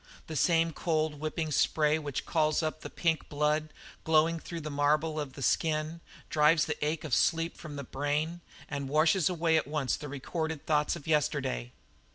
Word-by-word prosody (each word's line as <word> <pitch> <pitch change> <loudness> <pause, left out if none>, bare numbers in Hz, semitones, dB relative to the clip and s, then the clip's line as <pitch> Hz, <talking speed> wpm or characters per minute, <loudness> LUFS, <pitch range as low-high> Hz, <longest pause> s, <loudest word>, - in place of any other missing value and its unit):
The 160 - -6
same 165 +2 +3
cold, 155 -3 -1
whipping 155 +1 -2
spray 150 +2 +2
which 145 -3 -4
calls 155 -1 +1
up 155 0 -3
the - - -7
pink 165 -2 -1
blood, 150 +1 +1 0.3
glowing 160 +1 +3
through 170 +1 -6
the 150 0 -5
marble 150 +2 +1
of 145 -3 -4
the 135 - -7
skin, 155 +3 0 0.3
drives 150 +1 +4
the - - -3
ache 150 +1 -1
of 155 -5 -4
sleep 165 +5 +2
from 155 -3 -9
the 140 - -5
brain, 150 +6 -2 0.3
and 140 -2 -4
washes 155 +4 +3
away 165 -2 +2
at 155 - 0
once 145 -3 -1
all - - -16
the 150 - -7
recorded 160 +3 -4
thoughts 150 0 +2
of 170 - -10
yesterday. - - 0
155 Hz, 185 wpm, -30 LUFS, 150-160 Hz, 0.3 s, drives